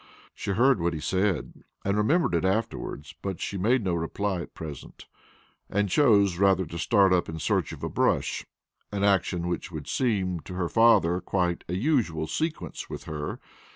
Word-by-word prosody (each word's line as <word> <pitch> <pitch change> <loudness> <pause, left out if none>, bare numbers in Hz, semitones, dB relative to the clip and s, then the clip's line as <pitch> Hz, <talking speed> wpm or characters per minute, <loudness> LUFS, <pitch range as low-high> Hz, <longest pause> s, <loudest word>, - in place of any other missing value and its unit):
She - - -6
heard 130 +2 +4
what 85 0 0
he - - -4
said, 95 +4 -1 0.2
and 100 +1 +1
remembered 130 - +2
it 85 - +1
afterward, 95 -6 -2 0.2
but 95 -3 -4
she - - -4
made 115 +6 +2
no 90 -2 0
reply 85 +3 -2
at - - -10
present, 75 -3 -9 0.6
and 100 0 0
chose 100 - +4
rather 95 -1 +4
to 85 +2 -7
start 95 0 +4
up 90 - +1
in 80 - -5
search 80 - 0
of - - -9
a - - 0
brush - - 0 0.5
an 100 -1 -2
action 90 -3 +2
which 90 +1 -3
would 80 -4 -7
seem 95 -9 0
to 90 - -9
her 90 -2 -1
father 105 -6 +4
quite 90 -3 -1
a 90 - -1
usual 100 - +1
sequence 155 - -3
with - - -6
her. 75 -1 -5
95 Hz, 180 wpm, -27 LUFS, 85-105 Hz, 0.6 s, heard